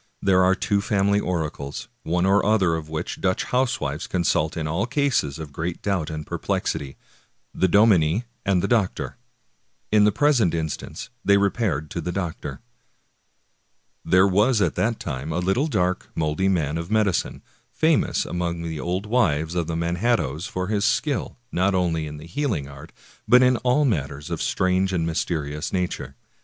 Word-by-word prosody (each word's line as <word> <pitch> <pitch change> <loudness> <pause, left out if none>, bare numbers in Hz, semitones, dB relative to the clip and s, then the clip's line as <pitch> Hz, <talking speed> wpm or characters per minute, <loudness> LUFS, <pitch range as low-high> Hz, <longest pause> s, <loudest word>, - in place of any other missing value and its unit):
There 95 -1 +3
are 95 +1 +4
two 100 +1 0
family 100 -1 +2
oracles, 80 -7 -3
one 90 +2 0
or 100 +1 +4
other 100 -5 +3
of 80 -1 -4
which 80 0 -4
Dutch 95 0 +1
housewives 95 - -1
consult 85 -3 0
in 80 - -2
all 90 +9 -1
cases 135 - 0
of 80 -2 -7
great 85 +3 -4
doubt 95 -6 -1
and 75 -1 -5
perplexity, 70 -1 -3 0.3
— - - -44
the 95 - +5
dominie 100 -1 +4 0.2
and 95 -3 +1
the - - +1
doctor. 110 -6 0 0.7
In 105 -1 +5
the 105 - +5
present 120 - +3
instance 80 -2 -5
they 100 0 +5
re 100 -1 +2
paired 80 - -2
to 85 - -3
the 90 - -3
doctor. 80 -7 -4 1.4
There 95 +1 +4
was 105 +5 +3
at 100 - +2
that 115 +1 0
time 70 0 -4
a 80 - -1
little 95 - +1
dark, 90 - -1
moldy 80 +4 0
man 80 -4 0
of 85 +2 -6
medicine, 105 -4 0 0.3
famous 160 -1 +2
among 85 -1 -3
the 80 -2 -4
old 90 +5 -2
wives 85 -9 +1
of 85 -2 -1
the 85 - -2
Manhattoes 85 - 0
for 90 -4 -3
his 100 +1 -1
skill, 130 +5 0
not 95 +2 +1
only 85 -4 0
in 75 0 -7
the 75 - -10
healing 105 - -2
art, 70 +3 -12 0.4
but 125 +1 +7
in 125 -1 +4
all 125 +5 +2
matters 75 - -2
of - - -2
strange 95 +1 +1
and 85 -3 0
mysterious 75 -2 -2
nature. 90 -7 -3
90 Hz, 170 wpm, -24 LUFS, 80-105 Hz, 1.4 s, but